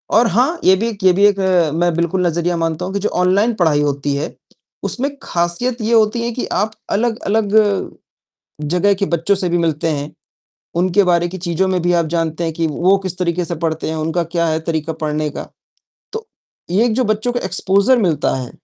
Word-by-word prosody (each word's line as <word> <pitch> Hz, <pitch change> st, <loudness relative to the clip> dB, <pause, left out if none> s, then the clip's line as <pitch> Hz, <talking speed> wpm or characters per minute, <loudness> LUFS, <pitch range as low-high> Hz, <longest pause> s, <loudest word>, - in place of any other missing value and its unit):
और 235 Hz, +1 st, +5 dB
हाँ, 255 Hz, -, +1 dB
ये 190 Hz, -, +6 dB
भी 225 Hz, +5 st, -1 dB
एक 200 Hz, -4 st, -8 dB
ये 185 Hz, -, +6 dB
भी 200 Hz, +3 st, +4 dB
एक 200 Hz, -1 st, +3 dB
अ, 180 Hz, -5 st, +2 dB
मैं 175 Hz, +2 st, +1 dB
बिल्कुल 170 Hz, +2 st, 0 dB
नज़रिया 170 Hz, +1 st, 0 dB
मानता 165 Hz, +1 st, -2 dB
हूँ 190 Hz, -, -5 dB
कि 200 Hz, -, -1 dB
जो 205 Hz, -, -1 dB
ऑनलाइन 200 Hz, +6 st, +3 dB
पढ़ाई 160 Hz, -6 st, +2 dB
होती 140 Hz, -1 st, -1 dB
है, 140 Hz, -, -4 dB, 0.5 s
उसमें 270 Hz, +3 st, -1 dB
खासियत 175 Hz, +9 st, -1 dB
ये 220 Hz, +2 st, 0 dB
होती 220 Hz, +1 st, +3 dB
है 235 Hz, -, -1 dB
कि 240 Hz, -, -3 dB
आप 215 Hz, +2 st, 0 dB, 0.2 s
अलग-अलग 220 Hz, -1 st, 0 dB
अ, 205 Hz, -3 st, +3 dB, 0.7 s
जगह 180 Hz, +7 st, +2 dB
के 200 Hz, +1 st, -1 dB
बच्चों 170 Hz, +3 st, +1 dB
से 185 Hz, -2 st, -1 dB
भी 175 Hz, -, +1 dB
मिलते 165 Hz, -1 st, 0 dB
हैं। 145 Hz, -1 st, -3 dB, 0.7 s
उनके 185 Hz, +3 st, +3 dB
बारे 175 Hz, -1 st, +2 dB
की 185 Hz, -, -7 dB
चीज़ों 175 Hz, +1 st, 0 dB
में 185 Hz, -1 st, 0 dB
भी 175 Hz, +1 st, +2 dB
आप 165 Hz, -, -1 dB
जानते 165 Hz, 0 st, -2 dB
हैं 165 Hz, -, -1 dB
कि 165 Hz, 0 st, 0 dB
वो 175 Hz, +5 st, +2 dB
किस 185 Hz, -1 st, -6 dB
तरीके 175 Hz, -1 st, 0 dB
से 170 Hz, -, -4 dB
पढ़ते 160 Hz, -1 st, -1 dB
हैं, 160 Hz, -, -3 dB
उनका 160 Hz, +2 st, -1 dB
क्या 170 Hz, 0 st, -1 dB
है 160 Hz, 0 st, 0 dB
तरीका 160 Hz, 0 st, -2 dB
पढ़ने 150 Hz, 0 st, -1 dB
का। -, -, -7 dB, 0.6 s
तो 445 Hz, +1 st, -6 dB, 0.4 s
ये 220 Hz, +7 st, +3 dB
जो 250 Hz, +3 st, +1 dB
बच्चों 215 Hz, +2 st, 0 dB
को 245 Hz, -, -1 dB
एक्सपोज़र 200 Hz, +6 st, +2 dB
मिलता 170 Hz, -, +1 dB
है 130 Hz, -2 st, -5 dB
180 Hz, 215 wpm, -18 LUFS, 165-205 Hz, 0.7 s, ये